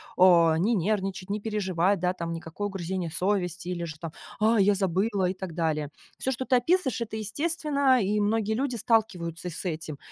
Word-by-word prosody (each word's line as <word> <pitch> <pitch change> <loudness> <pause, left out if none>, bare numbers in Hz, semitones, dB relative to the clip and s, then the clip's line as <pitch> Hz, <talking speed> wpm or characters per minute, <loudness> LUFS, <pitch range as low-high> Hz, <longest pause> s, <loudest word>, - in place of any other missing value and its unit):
о, 170 -3 +6
не 210 +8 +2
нервничать, 195 0 -1
не 210 - -1
переживать, 195 -3 0
да, 180 0 +1
там, 170 -2 -4
никакое 165 +5 -4
угрызение 185 -2 -3
совести, 180 -1 -1
или 175 -1 -3
же, 160 -2 -7
там: 165 -2 -6 0.3
"А, 220 +1 +4
я 200 +1 +4
забыла" 195 +1 +1
и 180 - -1
так 185 -3 -7
далее. 155 -3 -1 0.3
Всё, 265 - 0
что 260 +1 -3
ты 255 - +3
описываешь, 265 - +1
это 220 -1 -4
естественно, 280 +2 +1
и 210 +1 +1
многие 215 +1 +1
люди 255 +2 -1
сталкиваются 220 -6 +1 0.3
с 170 - -6
этим. 155 -3 -4
195 Hz, 185 wpm, -27 LUFS, 175-220 Hz, 0.3 s, о